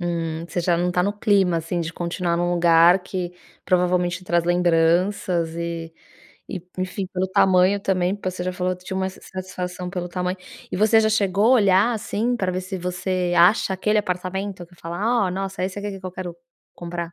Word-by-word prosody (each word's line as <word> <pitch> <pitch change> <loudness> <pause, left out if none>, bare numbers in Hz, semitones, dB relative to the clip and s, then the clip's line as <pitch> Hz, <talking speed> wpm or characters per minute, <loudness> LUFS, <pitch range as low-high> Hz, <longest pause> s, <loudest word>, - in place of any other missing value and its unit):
Hum. 165 -2 -2
Você 175 - -2
já 170 0 +2
não 175 +1 0
tá 180 - +2
no 200 +3 0
clima, 200 -4 +2
assim, 165 +2 -2
de 165 0 -4
continuar 170 0 -2
num 175 +1 0
lugar 170 +1 +5
que, 180 -1 -4 0.3
provavelmente 180 -1 +1
traz 170 -1 +1
lembranças 175 0 +2
e 170 -1 -4 0.6
e, 180 - -5 0.2
enfim, 185 +1 -3
pelo 185 0 -1
tamanho 190 +1 +4
também, 185 -1 0
porque 185 -2 -3
você 180 - -5
já 185 - -2
falou 180 0 -1
que 180 - -20
tinha 190 - -4
uma 190 0 0
insatisfação 180 -1 -6
pelo 180 -1 -4
tamanho 180 +1 -2 0.4
e - - -1
você 220 +2 +5
já 220 - +2
chegou 200 -1 +2
a - - +5
olhar, 200 +1 +4
assim, 225 +2 -1
pra 190 -5 -1
ver 185 - -2
se 185 +1 -5
você 180 0 -2
acha 190 +3 +5
aquele 210 +3 +1
apartamento, 185 0 -3
que 175 - -21
fala: 195 +7 0
"Oh, - - -2
nossa, 195 +1 -4
esse 190 +1 -4
aqui 205 0 -4
que 195 - -8
que 185 - -6
eu - - -5
quero 180 -2 -6 0.4
comprar"? 170 -1 -5
180 Hz, 200 wpm, -23 LUFS, 175-190 Hz, 0.6 s, lugar